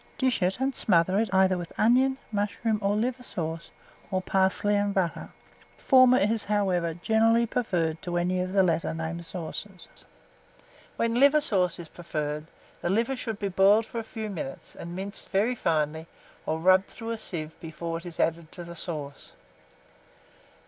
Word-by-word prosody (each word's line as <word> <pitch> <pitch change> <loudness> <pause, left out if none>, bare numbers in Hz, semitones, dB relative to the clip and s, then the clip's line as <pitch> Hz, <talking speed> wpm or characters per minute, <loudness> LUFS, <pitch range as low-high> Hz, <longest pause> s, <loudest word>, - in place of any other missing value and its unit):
Dish 260 -6 +1
it, 185 +5 +1
and 270 +1 0
smother 185 -2 +3
it 220 -3 0
either 190 -1 +3
with 175 - -7
onion, 260 +4 +3
mushroom, 210 +1 -1
or 200 0 +1
liver 245 +4 -1
sauce, 165 -8 -5 0.4
or 190 -2 0
parsley 190 +2 +1
and 205 0 0
butter; 180 -4 -1 0.5
the - - -21
former 255 -2 +6
is, 215 +1 +1
however, 185 -5 0
generally 225 +5 +3
preferred 175 -10 -1
to 175 -1 -3
any 180 +1 0
of 185 0 -3
the 195 0 +4
last 170 -2 +1
named 160 +1 -4
sauces. 185 +2 -8 0.9
When 230 +1 0
liver 285 +3 +6
sauce 185 - +2
is 170 - -8
preferred, 150 -2 -4 0.3
the - - -1
liver 230 +7 +1
should 225 -4 -4
be 200 -1 -2
boiled 195 +4 +4
for 230 - -5
a - - -4
few 220 -1 -6
minutes, 155 -7 -7
and 170 +1 -7
minced 195 +2 -4
very 205 +6 +2
finely, 160 -6 -1 0.4
or 160 - 0
rubbed 185 +3 +4
through 230 -1 -7
a 230 - -2
sieve 160 -6 -3
before 165 +1 -5
it 170 - -14
is 170 - -9
added 165 -1 0
to 175 - -7
the 170 0 -9
sauce. 150 -5 -6
190 Hz, 170 wpm, -27 LUFS, 170-220 Hz, 0.9 s, former